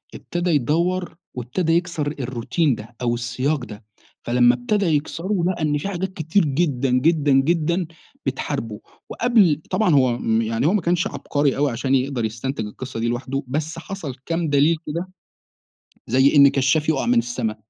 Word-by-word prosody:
ابتدى 175 +1 -3
يدور 170 +6 0 0.2
وابتدى 140 +8 -1
يكسر 170 -3 0
الروتين 130 +4 0
ده، 115 +2 -11
أو 120 -1 +1
السياق 125 +3 -2
ده، 105 0 -11 0.4
فلما 120 0 +4
ابتدا 190 +11 0
يكسره 170 +5 -1
لقي 185 -2 -2
إن 150 -1 +1
في 145 - -4
حاجات 190 0 -3
كتير 160 +4 +1
جدًا، 140 -3 0
جدًا، 145 +3 +2
جدًا، 170 +5 +2 0.4
بتحاربه 110 -2 -3 0.3
وقبل 205 -11 +3
طبعًا 185 +1 +2
هو 130 -3 +3
آمم، 115 -1 0
يعني 115 +4 0
هو 175 - +3
ما 210 - +2
كانش 175 +1 +1
عبقري 145 -2 -1
أوي 145 -1 +1
عشان 130 +3 0
يقدر 130 -3 0
يستنتج 115 +2 -3
القصّة 125 +3 -7
دي 115 - 0
لوحده، 130 +3 -2
بس 155 +5 -3
حصل 165 -7 -6
كام 165 -1 -1
دليل 145 +3 +3
كده 170 +5 -4 1.0
زي 130 +5 +4
إن 140 -1 +8
كشّاف 140 +3 +1
يقع 155 -4 +1
من 120 0 +3
السما، 115 -2 -2
145 Hz, 165 wpm, -22 LUFS, 125-170 Hz, 1.0 s, إن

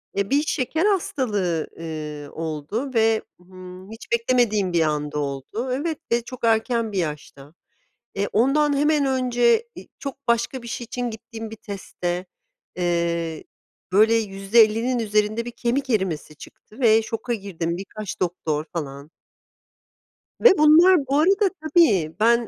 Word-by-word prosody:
eee, 200 0 -1
bir 285 +1 +3
şeker 310 +3 -1
hastalığı, 210 - 0
ııı, 150 -3 -6
oldu 165 - -4
ve, 225 -1 +3 0.2
ımm, 185 +1 -12
hiç 225 - -11
beklemediğim 230 -5 +2
bir 170 - +3
anda 150 -1 -1
oldu 145 - -4
Evet 310 +4 -2
ve 235 0 +3
çok 255 +1 -10
erken 225 0 +1
bir 200 - -4
yaşta. 150 -3 -5 0.6
Eee, 200 +1 -1
ondan 285 +5 +3
hemen 295 0 +2
önce, 255 - +2
iii, - - -11
çok 275 -2 -8
başka 235 +2 0
bir 235 - -8
şey 240 +1 -4
için 245 +1 -4
gittiğim 225 0 -8
bir 220 - -8
testte, 180 -3 -5 0.5
eee, 170 -2 -1 0.5
böyle, 220 +3 +5
%50'nin 220 +3 +2
üzerinde 215 0 0
bir 240 - -5
kemik 260 +3 -1
erimesi 185 - -1
çıktı 215 - -15
ve 225 -2 +5
şoka 225 +2 -3
girdim. 175 -5 -4
Birkaç 200 +1 -7
doktor 160 -4 -1
falan. 140 -3 -6 1.3
Ve 465 -5 +6
bunlar 325 +5 +7
bu 280 +2 +2
arada 390 +5 +3
Tabii, 285 - +3
ben 235 +1 +3
220 Hz, 140 wpm, -23 LUFS, 175-255 Hz, 1.3 s, bunlar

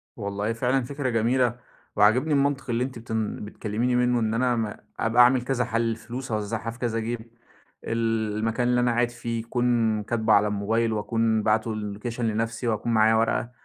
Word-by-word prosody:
والله 100 +1 -2
فعلًا 125 +3 +1
فكرة 140 +1 -3
جميلة، 120 +1 +1 0.4
وعاجبني 120 +9 +4
المنطق 140 -1 +1
اللي 120 +1 +1
أنتِ 130 -2 -5
بتن 110 -2 -3
بتكلّميني 110 +4 -2
منه 125 0 +2
إن 110 -1 0
أنا 125 +1 +1
م 110 -2 -2 0.3
أبقى 115 +2 +4
أعمل 125 +1 +4
كذا 125 0 -1
حل، 115 -1 0
الفلوس 115 +3 -4
أوزّعها 110 +1 -2
في 115 - -14
كذا 115 -2 -1
جيب، 115 0 -5 0.5
ال 115 -2 -1
المكان 115 +3 0
اللي 125 0 +2
أنا 120 0 +2
قاعد 120 +1 +1
فيه 115 -1 -4
يكون 115 -2 0
كاتبه 110 0 +1
على 105 0 +5
الموبايل 110 +3 0
وأكون 110 +1 0
باعته 110 +1 +1
اللوكيشن 110 +3 -4
لنفْسي 115 +2 -2
وأكون 115 +1 -1
معايا 110 0 +4
ورقة، 115 +1 0
115 Hz, 175 wpm, -25 LUFS, 110-120 Hz, 0.5 s, على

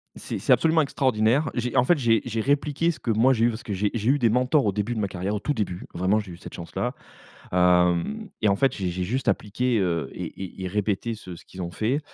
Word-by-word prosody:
C'est, - - -5
c'est - - 0
absolument 160 0 +4
extraordinaire. 130 -1 +1
J'ai 120 -1 -2
en 125 - +5
fait 175 +4 +4
j'ai 115 -5 +3
j'ai 115 -2 -2
répliqué 145 +5 +1
ce 160 - -10
que 115 - -1
moi 115 +5 +4
j'ai 115 -3 +3
eu - - +4
parce 115 +2 -6
que 110 - -6
j'ai 100 +1 0
j'ai 115 0 0
eu 145 +2 +3
des 120 -3 +3
mentors 125 +4 +2
au 100 - +1
début 105 +4 -1
de 115 - -3
ma 100 - 0
carrière, 95 +2 -3
au 105 - -1
tout 145 - -1
début, 95 -7 -3
vraiment 95 +4 +2
j'ai 105 -4 -7
eu - - -10
cette - - -11
chance 85 - -8
là. 125 +1 -1 0.6
Hem 90 - +2
et 110 - +3
en 100 - +3
fait 135 +5 +2
j'ai 95 -3 -2
j'ai 90 +1 -3
juste 125 +8 -2
appliqué, 115 +3 0
heu 85 -7 0
et - - -5 0.2
et 95 0 -7
et - - -2
répété 105 +4 -1
ce 90 -5 -9
ce - - -15
qu'ils 95 - -11
ont 85 -1 -3
fait 115 - -1
110 Hz, 265 wpm, -25 LUFS, 95-130 Hz, 0.6 s, en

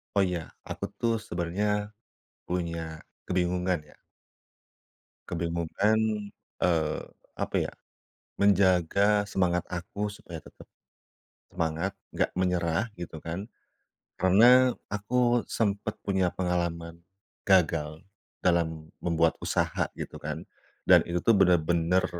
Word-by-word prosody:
Oh 100 - +5
ya 90 -4 -2 0.2
aku - - -4 0.2
tuh 115 -1 +2
sebenarnya 105 +3 -2 0.6
punya 85 -3 -3 0.2
kebingungan 90 0 +1
ya. 75 - -19 1.3
Kebingungan, 85 +5 0 0.6
eee, 80 -3 +1 0.4
apa - - -2
ya, - - +1 0.7
menjaga 100 +1 +4
semangat 90 -3 0
aku 100 +4 -3
supaya 85 -5 -9
tetep - - -15 0.8
semangat, 85 +2 -1 0.2
nggak - - +1
menyerah 90 +2 0
gitu 85 -2 -7
kan. 85 +6 -5 0.7
Karena 120 +8 +6 0.2
aku 120 +4 +1
sempet 105 -1 -1
punya 95 -3 +2
pengalaman 85 -2 -2 0.4
gagal 80 -3 +2 0.3
dalam 80 -3 0 0.2
membuat 85 -1 +2
usaha - - 0
gitu - - -6
kan - - -5 0.4
dan - - +7
itu 85 0 -1
tuh 115 - +5
bener-bener, 90 -1 +3
90 Hz, 100 wpm, -28 LUFS, 85-100 Hz, 1.3 s, dan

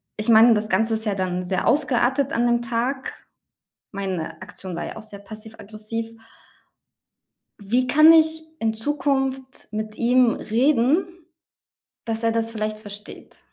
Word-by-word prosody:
ich 215 +2 -3
meine, 230 +1 +7
das 215 0 -1
Ganze 225 +1 +2
ist 220 0 0
ja 205 - -1
dann 180 -1 -2
sehr 185 +1 -1
ausgeartet 270 0 +1
an 235 - +1
dem 240 0 +2
Tag. 240 +3 -3 0.7
Meine 185 -5 -5
Aktion 185 -2 -8
war - - -4
ja - - -7
auch 220 - -9
sehr 210 -2 -11
passiv-aggressiv. 220 +2 -7 1.5
Wie 245 +5 0
kann 310 +4 +7
ich 320 0 +3 0.2
in 225 -1 +1
Zukunft 270 +1 -2
mit 215 0 -5
ihm 245 0 +3
reden, 300 - +1 0.8
dass 225 0 -3
er 230 - +2
das 225 0 -1
vielleicht 215 -1 -3
versteht? 205 -1 -11
225 Hz, 140 wpm, -23 LUFS, 215-260 Hz, 1.5 s, meine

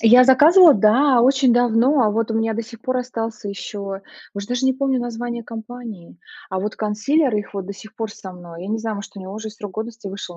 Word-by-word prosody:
Я 245 +3 +7
заказывала 310 +6 +7
да, 240 +6 +4
очень 265 0 +4
давно, 245 +4 +3
а 215 - +2
вот 225 +1 -1
у - - -1
меня 225 0 0
до 230 - -3
сих 230 0 -13
пор 255 +2 -1
остался 225 -4 -5
еще. 200 0 -6 0.3
Уж 200 0 -5
даже 245 +1 -2
не 265 - +4
помню 265 0 0
название 240 0 -5
компании, 225 -6 -9 0.3
а 190 - -2
вот 210 +2 -4
консилер 230 +6 0
их 205 -1 -5
вот 195 -2 -5
до 200 - -5
сих 215 +2 -14
пор 225 -1 -4
со 190 -3 -10
мной. 175 -1 -11
Я 190 - -7
не 220 +1 -1
знаю, 220 -1 -4
может, 200 - -8
у - - -7
него 190 +1 -8
уже 220 0 -6
с 215 - -17
срок 205 -3 -8
годности 225 0 -6
вышел, 190 -2 -8
225 Hz, 235 wpm, -21 LUFS, 205-245 Hz, 0.3 s, Я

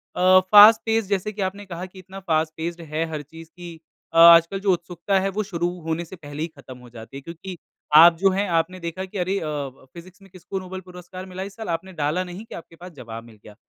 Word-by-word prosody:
अ, 185 +1 +6
fast 215 +2 +9
pace 225 -1 +1
जैसे 200 +1 -1
कि 205 - -6
आपने 195 +2 -4
कहा 180 -1 -7
कि 185 +1 -14
इतना 190 +1 -11
फ़ास्ट 160 -4 -1
पेस्ड 170 +1 -5
है 155 +1 -3
हर 155 -2 -4
चीज़ 160 +3 -14
कि 175 -2 -10 0.3
अ, - - -1
आजकल 170 +3 +7
जो 195 0 +1
उत्सुकता 175 +3 -2
है 195 +1 -1
वो 215 - 0
शुरू 175 -4 -2
होने 165 +1 -3
से 180 - -11
पहले 145 -3 -9
ही - - -2
ख़त्म 130 -2 -12
हो 125 -1 -15
जाती 115 +3 -11
है - - -9
क्योंकि 170 +4 -9 0.4
आप 170 +2 +9
जो 195 +3 +3
हैं 200 +2 -1
आपने 185 +3 -2
देखा 170 +2 -5
कि 190 - -9
अरे 185 +2 -1
अ, - - -6
व 140 -3 -6
फ़िज़िक्स 180 +2 -14
में 195 - -18
किसको 190 +2 -7
नोबेल 185 0 -8
पुरस्कार 180 +1 -11
मिला 185 0 -7
इस 195 0 -9
साल, 220 -2 -7
आपने 170 +3 -4
डाला 155 +2 -1
नहीं 180 +3 -9
कि - - -10
आपके 165 0 -12
पास 180 +2 -12
ज़वाब 115 -6 -9
मिल 115 -2 -17
गया। 105 - -14
175 Hz, 250 wpm, -23 LUFS, 160-190 Hz, 0.4 s, फ़ास्ट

